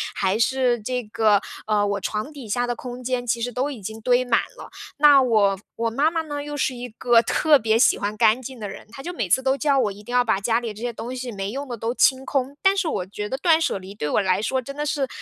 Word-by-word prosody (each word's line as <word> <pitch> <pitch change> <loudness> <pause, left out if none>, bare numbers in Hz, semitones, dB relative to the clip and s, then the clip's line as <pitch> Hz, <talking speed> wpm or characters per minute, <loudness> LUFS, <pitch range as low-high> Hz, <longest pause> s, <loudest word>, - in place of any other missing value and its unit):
还 195 +3 0
是 245 0 +2
这 250 +2 -3
个， 210 -1 +2 0.3
呃， 210 -1 +2
我 200 -1 -2
床 215 +8 -3
底 255 -7 -10
下 245 +3 0
的 240 0 -2
空 250 +1 -8
间， 245 -1 -2
其 230 0 0
实 245 +1 -2
都 260 +4 -1
已 260 -6 -7
经 220 +3 -7
堆 250 +2 +2
满 235 -2 +3 0.2
了。 - - -11 0.3
那 290 -2 +7
我 205 -6 +2 0.2
我 230 0 -1
妈 290 +7 +2
妈 330 -1 -1
呢， 290 -2 -5
又 295 0 -6
是 260 - 0
一 245 0 -7
个 230 +1 +3
特 295 +4 +3
别 220 0 +2
喜 245 - +4
欢 210 +1 -3
干 220 +5 +4
净 255 -1 -9
的 210 - -5
人， 195 - -10
她 270 +3 -10
就 355 - -5
每 195 - -3
次 260 +8 +3
都 265 0 +2
叫 280 0 +1
我 220 -6 +2
一 200 +1 -11
定 245 - -9
要 250 0 +4
把 220 -4 +1
家 225 +3 +1
里 230 -3 -5
这 215 - -12
些 240 0 -2
东 240 +3 -6
西 250 -1 -5
没 195 0 -4
用 280 +2 -5
的 240 -2 -5
都 230 +3 -2
清 265 0 +3
空， 275 +1 -2
但 385 +1 +5
是 390 -4 0
我 180 - -2
觉 210 +2 -6
得 265 - -2
断 325 +1 +3
舍 260 - 0
离 190 +1 -10
对 150 -7 -4
我 - - +2
来 190 +1 +1
说 260 +4 0
真 275 +3 -9
的 295 - -3
是， 280 -2 -1
245 Hz, 300 characters per minute, -23 LUFS, 215-270 Hz, 0.3 s, 那